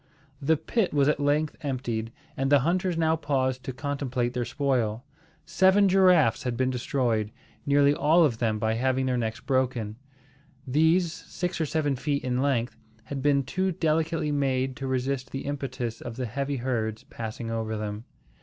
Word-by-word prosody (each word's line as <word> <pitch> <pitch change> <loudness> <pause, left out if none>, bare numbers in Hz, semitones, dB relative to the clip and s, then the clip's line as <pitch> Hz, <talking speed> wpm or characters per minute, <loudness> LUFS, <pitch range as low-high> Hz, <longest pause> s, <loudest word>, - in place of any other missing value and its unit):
The 155 +3 +3
pit 185 +4 -1
was 140 -1 +4
at 150 - +2
length 145 +2 +1
emptied; 120 -6 -3 0.2
and 135 +1 -1
the 145 -2 +6
hunters 175 +3 0
now 160 -1 +3
paused 130 -4 -1
to - - -3
contemplate 130 -3 -2
their 125 -1 -1
spoil. 125 -4 -1 0.4
Seven 190 +2 +4
giraffes 180 -11 +4
had 125 -2 -3
been 130 0 +1
destroyed, 120 -4 0 0.4
nearly 140 0 +5
all 160 +3 +4
of 120 -6 -1
them 110 -3 +1
by 110 +1 0
having 130 +3 +1
their 130 -1 +1
necks 110 -1 -2
broken. 125 -5 -1 0.7
These, 160 +5 +3
six 175 -1 -4
or 160 - 0
seven 145 -2 0
feet 140 +2 -2
in 125 0 0
length, 130 -4 0 0.3
had 135 +4 -5
been 140 0 +3
too 185 +7 -1
delicately 160 -1 0
made 135 -2 0
to 135 - -4
resist 130 0 -1
the 135 - -5
impetus 130 -5 -4
of 120 -1 -6
the 130 0 -3
heavy 140 +4 -2
herds 115 -3 -2
passing 115 0 -6
over 110 -1 -2
them. 105 +1 -5
135 Hz, 170 wpm, -27 LUFS, 120-150 Hz, 0.7 s, the